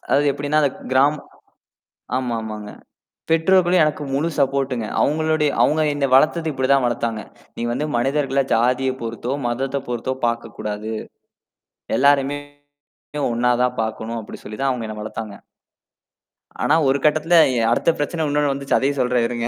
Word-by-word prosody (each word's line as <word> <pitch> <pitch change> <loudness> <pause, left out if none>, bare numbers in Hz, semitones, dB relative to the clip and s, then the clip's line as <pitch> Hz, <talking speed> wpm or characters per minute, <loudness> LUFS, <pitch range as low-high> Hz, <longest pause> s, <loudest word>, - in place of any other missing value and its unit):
அதாவது 145 +1 +3
எப்பிடின்னா 145 +2 -1
அது 145 - +4 0.2
கிராமம் 145 +3 +3 1.0
ஆமா, 125 -3 -2
ஆமாங்க. 105 -1 -7 0.6
பெற்றோர்களும் 175 +1 +4
எனக்கு 150 0 -1
முழு 150 +5 0
சப்போர்டுங்க. 135 -4 0 0.2
அவுங்களுடைய 155 0 +1
அவங்க 155 +1 +2
என்ன 145 -1 0
வளர்த்தது 155 +3 +3
இப்பிடி 130 -1 -2
தான் 135 -2 +3
வளர்த்தாங்க. 115 -2 -1 0.4
"நீ - - -3
வந்து 140 +5 -1
மனிதர்கள 135 +2 +1
ஜாதிய 125 +3 +2
பொறுத்தோ, 115 +3 -4
மதத்தப் 135 +3 -3
பொறுத்தோ 125 +2 -2
பார்க்கக் 115 -2 -4
கூடாது 105 +1 -4 1.1
எல்லாரையுமே 140 +1 +3 0.9
ஒண்ணா 125 +1 +2
தான் 125 0 -1
பாக்கணும்." 110 +1 -4
அப்பிடி 105 - -11
சொல்லித் 105 +6 -5
தான் 135 - +2
அவங்க 120 -3 -4
என்னை 110 - -6
வளர்த்தாங்க. 110 -1 -6 1.3
ஆனா, 155 - +3
ஒரு 135 +1 +3
கட்டத்துல 155 +3 +3 0.2
எ 115 - +2
அடுத்த 120 - +2
பிரச்சனை 155 +2 -1
உன்ணோண்ணு 145 0 +1
வந்துச்சு. 140 0 0
அதையும் 140 +1 0
சொல்றேன். 125 -1 +1
இருங்க. 120 -1 -3
135 Hz, 145 wpm, -21 LUFS, 120-145 Hz, 1.3 s, அது